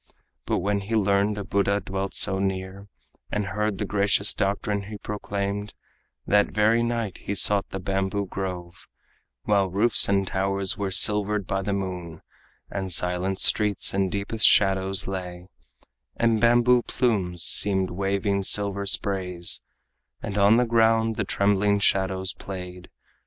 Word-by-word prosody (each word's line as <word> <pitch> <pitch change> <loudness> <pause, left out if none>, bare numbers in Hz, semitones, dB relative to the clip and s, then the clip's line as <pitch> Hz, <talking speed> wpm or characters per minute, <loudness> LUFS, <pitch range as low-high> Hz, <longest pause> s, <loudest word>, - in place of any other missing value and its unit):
But - - 0
when 100 +2 -1
he 100 +3 -4
learned 100 0 +1
a 100 - -4
Buddha 100 +1 0
dwelt 95 0 -5
so 95 0 +3
near, 95 0 -4 0.4
And 105 -1 -2
heard 105 +1 -2
the - - -3
gracious 100 0 +1
doctrine 100 0 -2
he 105 - -7
proclaimed, 100 0 -5 0.5
That 105 0 +3
very 110 +2 +2
night 115 -4 -3
he 100 - -5
sought 100 0 +2
the - - -6
bamboo 95 +1 -2
grove, 90 -2 -7 0.6
While 100 -2 +1
roofs 105 +6 +3
and 100 -1 +1
towers 95 0 -1
were 100 -1 -3
silvered 105 +1 +3
by 95 +1 -2
the 100 +1 -3
moon, 90 -4 -6 0.5
And 95 -2 -4
silent 90 +2 0
streets 105 -2 +3
in 95 -1 0
deepest 100 +3 +2
shadows 95 0 +3
lay, 90 -1 -7 0.7
And 115 -2 +1
bamboo 120 +1 +4
plumes 95 -9 -1
seemed 95 -2 +2
waving 100 +2 -1
silver 100 0 0
sprays, 90 -2 0 0.6
And 100 - -6
on 105 +2 +4
the 125 - +2
ground 115 -1 +2
the 105 - -2
trembling 100 +1 +1
shadows 95 -1 0
played. 90 -2 -9
100 Hz, 140 wpm, -24 LUFS, 95-105 Hz, 0.7 s, bamboo